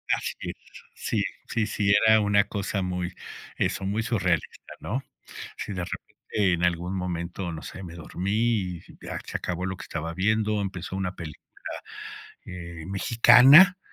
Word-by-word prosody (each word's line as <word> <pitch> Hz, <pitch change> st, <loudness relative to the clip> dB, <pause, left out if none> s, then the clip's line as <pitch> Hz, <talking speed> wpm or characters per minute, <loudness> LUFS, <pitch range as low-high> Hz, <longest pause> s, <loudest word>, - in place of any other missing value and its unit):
Así -, -, -4 dB
es, -, -, -4 dB, 0.4 s
sí, -, -, -1 dB, 0.3 s
sí, 110 Hz, -2 st, 0 dB
sí, 100 Hz, -1 st, +2 dB
era 110 Hz, 0 st, +6 dB
una 100 Hz, -1 st, +4 dB
cosa 100 Hz, -1 st, -2 dB
muy, 90 Hz, -1 st, -2 dB, 0.4 s
eso, -, -, 0 dB
muy 105 Hz, +4 st, 0 dB
surrealista, 105 Hz, -6 st, -1 dB
¿no? 130 Hz, +6 st, -3 dB, 0.5 s
Sí, -, -, -5 dB
de 90 Hz, -2 st, -3 dB
repente 100 Hz, +1 st, -2 dB
en 85 Hz, 0 st, 0 dB
algún 90 Hz, +2 st, 0 dB
momento, 90 Hz, 0 st, -3 dB
no 80 Hz, 0 st, -7 dB
sé, 95 Hz, -, -8 dB
me 85 Hz, -, -8 dB
dormí, 90 Hz, +3 st, -4 dB
y 105 Hz, -6 st, 0 dB, 0.2 s
ya -, -, -5 dB
se -, -, -3 dB
acabó 90 Hz, 0 st, -3 dB
lo 95 Hz, 0 st, -3 dB
que -, -, -9 dB
estaba 85 Hz, 0 st, -4 dB
viendo, 105 Hz, +2 st, +1 dB
empezó 95 Hz, -1 st, -4 dB
una 95 Hz, -1 st, -2 dB
película, 80 Hz, -4 st, -9 dB, 0.8 s
eh, 85 Hz, -3 st, -8 dB
mexicana, 125 Hz, -, +7 dB
95 Hz, 155 wpm, -26 LUFS, 90-105 Hz, 0.8 s, mexicana